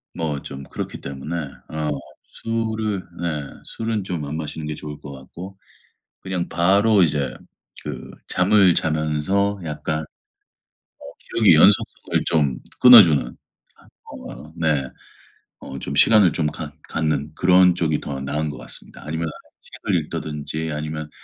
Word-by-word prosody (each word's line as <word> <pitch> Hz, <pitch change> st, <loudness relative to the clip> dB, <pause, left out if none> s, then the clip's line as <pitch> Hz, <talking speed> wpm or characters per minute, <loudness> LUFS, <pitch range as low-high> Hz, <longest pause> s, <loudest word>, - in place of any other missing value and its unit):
뭐 75 Hz, -4 st, -2 dB
좀 70 Hz, 0 st, -8 dB
그렇기 -, -, -6 dB
때문에 70 Hz, +5 st, -6 dB, 0.3 s
어 75 Hz, -1 st, -3 dB, 0.3 s
술은 110 Hz, -3 st, -3 dB, 0.2 s
네 75 Hz, -4 st, -2 dB, 0.2 s
술은 110 Hz, -2 st, -3 dB
좀 85 Hz, -5 st, -3 dB
안 75 Hz, +2 st, -4 dB
마시는 80 Hz, 0 st, -5 dB
게 75 Hz, -, -3 dB
좋을 75 Hz, 0 st, -8 dB
것 70 Hz, -, -9 dB
같고 85 Hz, +8 st, -10 dB, 0.6 s
그냥 95 Hz, -2 st, -3 dB
바로 100 Hz, +3 st, +4 dB
이제 70 Hz, -5 st, 0 dB, 0.5 s
그 75 Hz, -4 st, -7 dB, 0.2 s
잠을 95 Hz, 0 st, +4 dB
자면서 80 Hz, +7 st, 0 dB
약간 75 Hz, 0 st, -3 dB
어 80 Hz, -, -15 dB, 0.9 s
기억의 105 Hz, -7 st, +4 dB
연속성을 95 Hz, +6 st, +3 dB
좀 70 Hz, -5 st, +1 dB, 0.2 s
끊어주는 95 Hz, -, +9 dB, 0.8 s
어 75 Hz, -, -10 dB
네. 75 Hz, -5 st, +1 dB, 0.7 s
어 70 Hz, -, -8 dB
좀 -, -, -5 dB
시간을 105 Hz, -6 st, +6 dB
좀 80 Hz, -2 st, 0 dB
갖 75 Hz, -1 st, -6 dB, 0.2 s
갖는 75 Hz, -2 st, -1 dB
그런 90 Hz, -1 st, +5 dB
쪽이 80 Hz, -3 st, 0 dB
더 70 Hz, -2 st, -5 dB
나은 75 Hz, +3 st, -2 dB
것 -, -, -7 dB
같습니다. -, -, -11 dB
아니면은 80 Hz, +1 st, -3 dB, 0.4 s
책을 -, -, -2 dB
읽는다든지 80 Hz, +1 st, -4 dB
아니면 75 Hz, 0 st, -4 dB
80 Hz, 250 characters per minute, -22 LUFS, 75-95 Hz, 0.9 s, 끊어주는